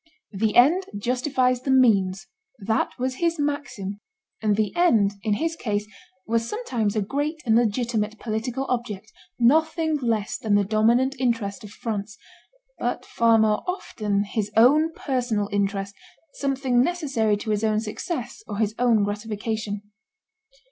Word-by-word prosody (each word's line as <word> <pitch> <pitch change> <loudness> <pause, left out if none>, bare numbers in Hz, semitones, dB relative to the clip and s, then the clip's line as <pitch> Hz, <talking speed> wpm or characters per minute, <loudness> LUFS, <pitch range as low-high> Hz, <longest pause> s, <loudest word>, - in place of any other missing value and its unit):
"The 210 +1 0
end 325 +10 +5
justifies 250 +2 +1
the 270 - -5
means" 200 -8 +3 0.3
that 220 +1 0
was 255 +1 -2
his 335 0 +1
maxim; 285 -9 -3 0.4
and 210 -2 +2
the 215 -1 -1
end, 225 - +4
in 210 -1 0
his 325 +6 -1
case, 210 -8 -2 0.4
was 230 +1 0
sometimes 235 - -2
a 215 - +1
great 290 +8 -2
and 225 -2 +3
legitimate 220 -1 0
political 235 +5 -3
object, 220 -4 -3 0.3
nothing 315 +5 +3
less 225 -6 -1
than 210 -2 +1
the 205 - +4
dominant 235 +6 +2
interest 230 -4 -1
of 210 - -9
France, 210 0 -5 0.6
but - - -2
far 230 -1 +3
more 215 -1 +2
often 210 - -1
his 210 0 -3
own 300 +8 +5
personal 245 -9 -1
interest, 200 0 -1 0.4
something 270 -3 +1
necessary 265 -10 +1
to 215 +1 -4
his 210 +1 0
own 215 -1 +2
success 240 - -5
or 205 - -5
his 215 -1 0
own 235 -4 +4
gratification. 210 0 -3
225 Hz, 140 wpm, -24 LUFS, 210-260 Hz, 0.6 s, end